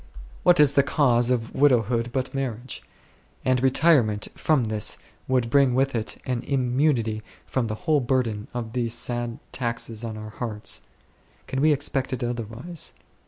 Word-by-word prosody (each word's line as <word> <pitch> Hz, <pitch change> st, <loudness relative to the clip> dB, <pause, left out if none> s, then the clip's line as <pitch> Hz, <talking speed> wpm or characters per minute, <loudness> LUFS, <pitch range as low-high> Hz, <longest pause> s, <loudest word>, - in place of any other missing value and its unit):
What 175 Hz, -2 st, +5 dB
is 145 Hz, -2 st, +6 dB
the 140 Hz, -, +5 dB
cause 125 Hz, -3 st, +2 dB
of 115 Hz, -3 st, -1 dB
widowhood 120 Hz, -4 st, +2 dB
but 130 Hz, 0 st, -2 dB
marriage? 130 Hz, -2 st, -4 dB, 0.6 s
And 130 Hz, -1 st, +2 dB
retirement 130 Hz, -6 st, +3 dB
from 150 Hz, -5 st, +1 dB
this 110 Hz, -1 st, +1 dB, 0.3 s
would 125 Hz, -3 st, +1 dB
bring 135 Hz, -3 st, +4 dB
with 135 Hz, +1 st, +2 dB
it 115 Hz, -2 st, -3 dB
an 125 Hz, -2 st, -1 dB
immunity 125 Hz, -4 st, +1 dB, 0.2 s
from 125 Hz, -3 st, -1 dB
the 110 Hz, -, -3 dB
whole 155 Hz, -3 st, +4 dB
burden 120 Hz, -5 st, -1 dB
of 115 Hz, -2 st, -5 dB
these 120 Hz, -2 st, 0 dB
sad 120 Hz, -1 st, -2 dB
taxes 115 Hz, -2 st, -2 dB
on 110 Hz, -2 st, -5 dB
our 110 Hz, 0 st, -8 dB
hearts. 110 Hz, -2 st, -3 dB, 0.6 s
Can 135 Hz, -, -2 dB
we 155 Hz, +1 st, +5 dB
expect 140 Hz, -2 st, 0 dB
it 125 Hz, -, -3 dB
otherwise 120 Hz, +7 st, -3 dB
125 Hz, 155 wpm, -25 LUFS, 115-135 Hz, 0.6 s, is